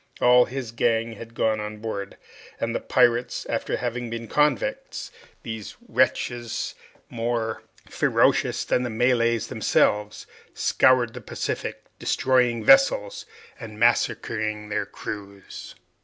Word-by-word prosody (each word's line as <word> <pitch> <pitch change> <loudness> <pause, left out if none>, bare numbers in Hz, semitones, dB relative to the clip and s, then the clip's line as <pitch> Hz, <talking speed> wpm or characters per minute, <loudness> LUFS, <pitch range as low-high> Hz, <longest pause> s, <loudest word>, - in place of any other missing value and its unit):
All 125 0 +6
his 130 -3 -6
gang 115 0 +1
had 115 +1 -11
gone 110 -2 +1
on 105 0 -5
board, 105 -2 -5 0.4
and - - -3
pirates 120 +1 +2
after - - -2
having 120 -1 -3
been 115 0 -5
convicts, 150 -3 0 0.3
these 110 -2 -7
wretches, 120 -1 0 0.3
more 115 -1 -2 0.3
ferocious - - +2
than - - +1
the 125 - -2
Malays 115 -1 +2
themselves, 105 0 +1 0.3
scoured 125 -3 +3
the - - -8
Pacific, - - -4 0.2
destroying 125 -3 +1
vessels, - - +4 0.3
and 110 -3 -9
massacring 110 -2 0
their 105 -1 -2
crews. 100 -2 -8
115 Hz, 110 wpm, -24 LUFS, 110-125 Hz, 0.4 s, All